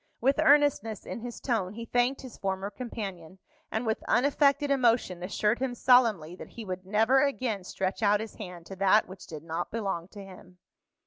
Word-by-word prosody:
With 270 +4 +2
earnestness 280 -8 +3
in - - -5
his 240 +1 -7
tone, 210 -7 -1
he 230 0 -6
thanked 245 +3 +1
his 255 -4 -9
former 195 +1 -2
companion, 195 -8 -7 0.3
and 220 +2 -2
with 220 0 -1
unaffected 280 +2 +3
emotion 235 -9 +2
assured 210 +4 0
him 255 -2 -2
solemnly 225 -10 +3
that - - -10
he 230 - -9
would 185 -1 -6
never 225 +6 +4
again 255 -8 -1
stretch 190 +3 -3
out 205 -1 +4
his 220 0 -6
hand 180 -5 -8
to 195 - -8
that 195 +3 +4
which 190 0 -11
did 155 -2 -8
not 165 +1 -4
belong 195 -6 -3
to 200 +1 -11
him. 185 -1 -14
215 Hz, 185 wpm, -28 LUFS, 190-245 Hz, 0.3 s, never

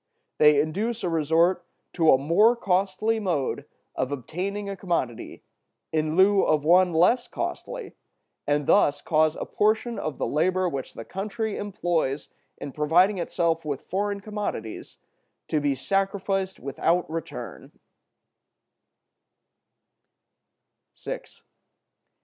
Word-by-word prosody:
They 150 -1 +6
induce 210 +10 -1
a 180 - 0
resort 165 +3 +2 0.3
to 165 -3 +4
a - - +6
more 170 - +4
costly 200 +2 0
mode 170 -10 -2 0.3
of 130 +1 -2
obtaining 185 - -4
a 200 - -4
commodity 170 - -3 0.5
in 155 0 0
lieu 195 +2 +5
of 150 -1 +1
one 180 +2 +5
less 230 +10 +3
costly, 390 - -5 0.5
and 145 0 +1
thus 145 +1 +4
cause 155 0 +2
a - - -5
portion 220 +3 0
of 155 - -4
the - - -1
labor 185 +4 +1
which 135 -6 -5
the 115 - -8
country 215 +2 -3
employs 175 -8 -2 0.3
in 140 - -7
providing 175 +7 +3
itself 170 -1 0
with 145 -3 -3
foreign 200 +1 -2
commodities 205 - -5 0.5
to 155 - +1
be 145 -1 0
sacrificed 195 +4 -1
without 165 +6 0
return. 165 +1 -7
175 Hz, 115 wpm, -25 LUFS, 155-200 Hz, 0.5 s, They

